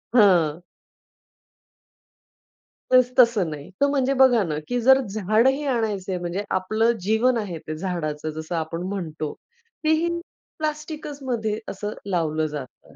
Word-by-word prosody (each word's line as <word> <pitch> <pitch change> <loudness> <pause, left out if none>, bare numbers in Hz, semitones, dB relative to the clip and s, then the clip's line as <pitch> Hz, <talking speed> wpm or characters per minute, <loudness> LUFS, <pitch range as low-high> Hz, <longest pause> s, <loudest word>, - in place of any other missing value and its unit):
हां. 175 -7 +5 2.3
तस 255 -1 +5
तसं 225 -8 +5
नाही. 145 -1 -8
तर 280 - +5
म्हणजे 275 -1 +1
बघा 245 -5 +6
ना, 155 -4 -2
की 245 0 0
जर 265 +2 +6
झाडही 220 +8 +2
आणायचंय 200 -5 -1
म्हणजे 175 +3 -3
आपलं 215 +5 +1
जीवन 225 +5 +2
आहे 190 -7 -3
ते 155 - -3
झाडाचं 155 -4 -3
जसं 160 +2 -4
आपण 165 +1 -3
म्हणतो 160 -6 -4 0.5
तेही 315 +2 +3 0.5
प्लास्टिकचमध्ये 290 -8 -3
असं 205 +2 -4
लावलं 160 -5 0
जातं. 145 -4 -9
205 Hz, 120 wpm, -24 LUFS, 170-250 Hz, 2.3 s, बघा